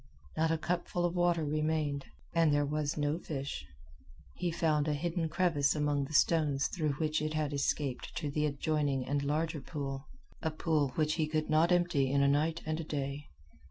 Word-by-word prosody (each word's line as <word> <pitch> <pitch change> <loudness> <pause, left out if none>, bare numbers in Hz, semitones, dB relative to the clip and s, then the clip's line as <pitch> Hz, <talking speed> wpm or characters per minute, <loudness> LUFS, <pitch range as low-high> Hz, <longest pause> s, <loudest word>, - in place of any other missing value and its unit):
Not 160 +1 +2
a 165 - +2
cupful 175 +1 -1
of 175 - 0
water 175 -2 +2
remained. 155 -1 0 0.3
And 165 -2 +4
there 145 0 +3
was 150 +1 -1
no 150 +2 0
fish. 135 - -5 0.7
He 180 - -2
found 160 -3 +1
a 150 - +1
hidden 165 +1 -1
crevice 160 -4 +2
among 145 -2 +1
the 155 - -9
stones 145 -4 +3
through 155 -5 -1
which 155 +2 0
it 155 0 -2
had 155 -1 -1
escaped 140 -2 -1
to 150 -3 -2
the 150 +1 +1
adjoining 145 -2 0
and 145 +1 0
larger 150 +1 -1
pool 135 -1 -5 0.3
a 160 - 0
pool 155 -2 +1
which 155 -1 +2
he 155 - +1
could 155 0 -1
not 160 +3 +4
empty 175 -7 +3
in 140 0 +3
a - - +4
night 155 +4 +1
and 155 +1 -1
a - - -2
day. 140 -1 -4
150 Hz, 190 wpm, -32 LUFS, 145-160 Hz, 0.7 s, And